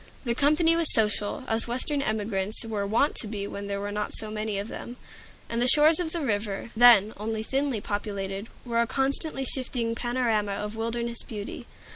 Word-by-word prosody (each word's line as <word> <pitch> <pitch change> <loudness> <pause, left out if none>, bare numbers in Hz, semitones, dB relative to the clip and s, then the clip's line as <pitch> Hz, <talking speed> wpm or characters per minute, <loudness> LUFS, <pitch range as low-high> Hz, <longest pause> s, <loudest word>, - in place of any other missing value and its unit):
The 235 -3 0
company 305 +6 +4
was 335 -2 +4
social, 210 +1 +1
as 225 +1 +2
Western 260 +4 0
emigrants 210 -2 -2
were 210 -3 -2
wont 235 +8 +2
to 220 - -2
be 205 -1 -4
when 200 0 -6
there 200 0 -3
were 205 0 -4
not 210 0 -3
so 215 - -4
very - - -7
many 215 -1 -2
of 200 +1 -3
them, 240 +1 -8 0.5
and 235 0 -2
the 245 - +4
shores 305 +5 +7
of 335 -3 -2
the 340 - -2
river, 205 -1 -2
then 225 -3 +7
only 220 +1 -3
thinly 270 -2 -1
populated, 200 -1 -4 0.2
were 235 -1 +1
a 235 - 0
constantly 270 +1 -1
shifting 245 -3 -1
panorama 230 -4 0
of 210 +2 -4
wilderness 235 +1 -2
beauty. 210 -2 -7
225 Hz, 190 wpm, -26 LUFS, 205-255 Hz, 0.5 s, shores